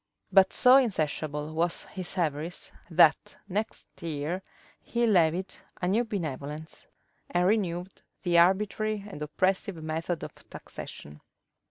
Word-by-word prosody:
But 195 0 +6
so 255 +1 +7
insatiable 155 - -1
was 165 +2 0
his 185 0 -6
avarice, 160 0 -2 0.2
that 165 -2 +4
next 210 +3 -3
year 160 +3 -3 0.4
he 235 0 0
levied 185 -2 +2 0.3
a 180 - -1
new 215 +6 +2
benevolence, 155 - -5 0.4
and 175 0 +2
renewed 185 -3 0 0.2
that 175 -1 +1
arbitrary 200 +4 +3
and 190 -7 -9
oppressive 190 +5 0
method 160 +1 -3
of - - -7 0.2
taxation. 75 0 -9
175 Hz, 120 wpm, -28 LUFS, 155-195 Hz, 0.4 s, so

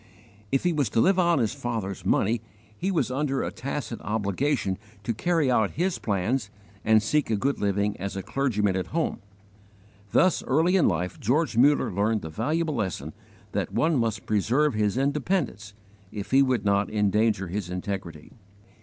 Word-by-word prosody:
If 135 - +1
he 175 -1 +2
was 145 -7 +1
to 115 - 0
live 190 +9 +4
on 170 -2 +3
his 115 -3 +1
father's 115 -9 -4
money, 105 +4 +1 0.3
he 185 - -2
was 170 -8 0
under 135 0 0
a - - -3
tacit 135 -4 -5
obligation 105 0 -1 0.2
to 115 - -1
carry 155 +3 +1
out 110 -5 +2
his 180 +2 0
plans 105 +3 -1 0.3
and 110 -1 +4
seek 150 +4 +1
a 110 - +2
good 135 +7 -1
living 100 0 0
as 100 +1 -5
a 95 - -4
clergyman 105 -8 0
at 95 - -2
home. 165 0 -1 0.9
Thus 185 -2 +3
early 160 +7 +3
in 185 - +4
life 90 +1 -1
George 140 +4 +1
Muller 140 +5 +4
learned 105 +3 +1
the 80 - -5
valuable 155 - -1
lesson 100 - -3 0.4
that - - -2
one 160 0 +2
must 115 -5 -1
preserve 120 +8 +2
his 105 +1 0
independence 140 - -1 0.4
if 100 -2 -6
he 135 +1 +6
would 130 -6 +1
not 100 0 +2
endanger 105 -2 +1
his 95 -1 -3
integrity. 90 -4 -5
115 Hz, 170 wpm, -26 LUFS, 100-145 Hz, 0.9 s, he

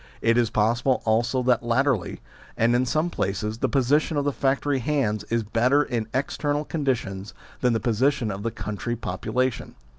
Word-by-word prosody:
It 115 - +2
is 120 -2 +2
possible 120 +5 +1
also 120 +3 +1
that 125 -1 +3
latterly, 120 -3 0 0.4
and 115 +2 +3
in 125 +1 +1
some 155 +6 0
places, 105 - -2
the - - 0
position 145 +4 +2
of 145 - 0
the 145 - +1
factory 135 +1 0
hands 120 -6 0
is 115 0 -1
better 125 +7 +2
in 115 -5 -3
external 145 +3 -1
conditions 120 - -3 0.2
than 125 -2 +2
the 115 - +1
position 120 +1 +1
of 100 +1 -5
the 115 - -1
country 110 +2 -4
population. 120 +5 -2
120 Hz, 170 wpm, -25 LUFS, 110-135 Hz, 0.4 s, that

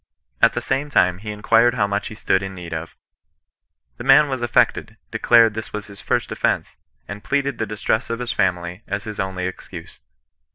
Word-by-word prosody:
At - - +5
the - - -2
same 135 +2 -1
time 90 -9 +2
he 105 +1 -8
inquired 115 +3 +3
how 105 -4 +2
much 100 0 -2
he 110 - -8
stood 95 -2 +1
in 95 0 -6
need 85 -2 -8
of. 80 +1 -6 1.0
The - - -7
man 150 - +6
was 130 -2 -3
affected, 120 -2 +1
declared 115 -2 +5
this 110 0 -6
was 105 -1 -4
his 100 -1 -12
first - - -1
offence, - - -1 0.3
and 100 +1 -8
plead 140 -1 0
ed 140 -4 -3
the 110 - -1
distress 105 +3 -1
of 115 - -2
his 125 0 -3
family 90 -2 -1
as 100 +1 -3
his 105 -2 -7
only 95 -1 -2
excuse. 95 - -8
105 Hz, 200 wpm, -21 LUFS, 95-115 Hz, 1.0 s, man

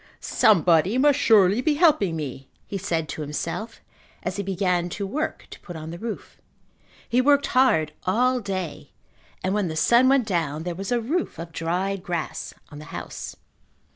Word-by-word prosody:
"Somebody 180 0 +3
must 285 +1 +4
surely 210 -2 +5
be 295 +3 +2
helping 290 - +3
me," 135 -3 -6 0.2
he 200 - -5
said 165 -5 -1
to - - -5
himself 165 +9 -4 0.4
as 185 - -3
he - - -1
began 180 -2 0
to 200 +3 -4
work 305 +10 -3
to - - -10
put 175 - -10
on 160 0 -7
the 170 - -8
roof. 225 +1 -7 0.7
He 245 +2 +3
worked 285 +1 +4
hard 160 - +3
all 250 +6 +2
day 190 -7 -5 0.5
and 185 +1 0
when 205 -3 0
the 160 - -4
sun 240 +10 +4
went 270 -3 +3
down, 160 -6 -1
there 175 0 -3
was 195 +6 -5
a 245 - +2
roof 295 - -2
of 165 +1 -7
dried 180 +4 -2
grass 170 -3 -4 0.2
on 145 - -9
the 150 - -10
house. - - -7
195 Hz, 175 wpm, -24 LUFS, 165-240 Hz, 0.7 s, surely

